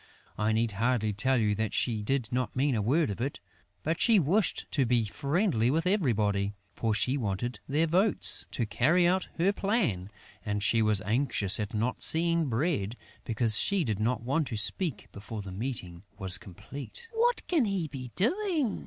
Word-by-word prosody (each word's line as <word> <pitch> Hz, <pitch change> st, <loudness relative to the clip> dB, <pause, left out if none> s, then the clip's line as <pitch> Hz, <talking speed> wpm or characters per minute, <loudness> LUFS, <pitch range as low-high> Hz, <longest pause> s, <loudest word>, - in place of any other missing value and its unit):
I 105 Hz, +1 st, 0 dB
need 110 Hz, +1 st, +1 dB
hardly 110 Hz, +1 st, 0 dB
tell 130 Hz, +6 st, +2 dB
you 105 Hz, -3 st, +1 dB
that 110 Hz, +1 st, -2 dB
she 115 Hz, -4 st, 0 dB
did 120 Hz, +1 st, -1 dB
not 125 Hz, -2 st, -2 dB
mean 135 Hz, +2 st, +1 dB
a 110 Hz, -, 0 dB
word 135 Hz, +4 st, +1 dB
of 100 Hz, -, -6 dB
it; 135 Hz, +3 st, -3 dB, 0.4 s
but 160 Hz, +2 st, -1 dB
she 230 Hz, -3 st, +5 dB
wished 185 Hz, +5 st, +1 dB
to 140 Hz, -, +2 dB
be 120 Hz, -2 st, +1 dB
friendly 140 Hz, -, 0 dB
with 160 Hz, +5 st, 0 dB
everybody, 105 Hz, -, +1 dB, 0.2 s
for 110 Hz, -2 st, -1 dB
she 130 Hz, +5 st, +1 dB
wanted 115 Hz, +1 st, -3 dB
their 150 Hz, +4 st, +2 dB
votes, 185 Hz, +6 st, +2 dB
to 120 Hz, -, -2 dB
carry 160 Hz, +11 st, +2 dB
out 185 Hz, +1 st, 0 dB
her 185 Hz, +4 st, +2 dB
plan; 195 Hz, -, -1 dB, 0.3 s
and 105 Hz, -1 st, -2 dB
she 115 Hz, +2 st, +3 dB
was 110 Hz, -2 st, +2 dB
anxious 105 Hz, -3 st, +1 dB
at 105 Hz, +1 st, -4 dB
not 115 Hz, +4 st, -2 dB
seeing 165 Hz, -1 st, +3 dB
Bread, 120 Hz, -, -1 dB, 0.3 s
because 110 Hz, -1 st, +3 dB
she 200 Hz, -3 st, +2 dB
did 110 Hz, -7 st, -2 dB
not 115 Hz, +1 st, -1 dB
want 140 Hz, +4 st, 0 dB
to 115 Hz, -, -4 dB
speak 115 Hz, -, -1 dB
before 105 Hz, +1 st, -8 dB
the 95 Hz, -, -8 dB
meeting 95 Hz, -5 st, -5 dB, 0.2 s
was 95 Hz, -2 st, +6 dB
complete: 135 Hz, -, -9 dB
"What 475 Hz, +2 st, +1 dB
can 320 Hz, -9 st, +2 dB
he 195 Hz, -5 st, -2 dB
be 130 Hz, -4 st, -8 dB
doing?" 315 Hz, -, 0 dB
125 Hz, 180 wpm, -29 LUFS, 105-165 Hz, 0.4 s, was